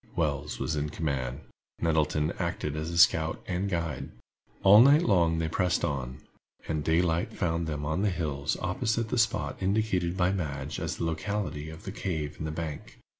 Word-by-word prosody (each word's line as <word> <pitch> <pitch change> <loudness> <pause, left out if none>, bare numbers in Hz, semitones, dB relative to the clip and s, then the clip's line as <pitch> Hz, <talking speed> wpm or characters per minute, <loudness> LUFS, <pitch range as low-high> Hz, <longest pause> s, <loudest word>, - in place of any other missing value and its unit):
Wells 75 -2 -1
was 80 - -2
in 75 0 -1
command. 70 -4 -3 0.4
Nettleton 80 -1 +1
acted 85 -4 -2
as 80 +3 -2
scout 80 -1 +4
and 95 +2 -2
guide. 85 -4 -2 0.5
All 100 +3 +9
night 145 +6 +6
long 85 - +3
they 80 0 0
pressed 90 +2 +1
on, 65 -3 -4 0.5
and 80 -2 -1
daylight 85 +1 +1
found 85 -2 -1
them 75 -1 -3
on 80 +5 -1
the 105 - +2
hills 75 -5 -2
opposite 110 +5 0
the 125 - 0
spot 75 -10 +1
indicated 95 -3 0
by 90 0 +3
Madge 75 -6 -3
as - - -3
the - - -2
locality 80 -2 -3
of 80 0 -10
the 95 - -5
cave 80 -7 -3
in 80 - -3
the 80 - -3
bank. 80 -2 -6
80 Hz, 175 wpm, -28 LUFS, 75-95 Hz, 0.5 s, All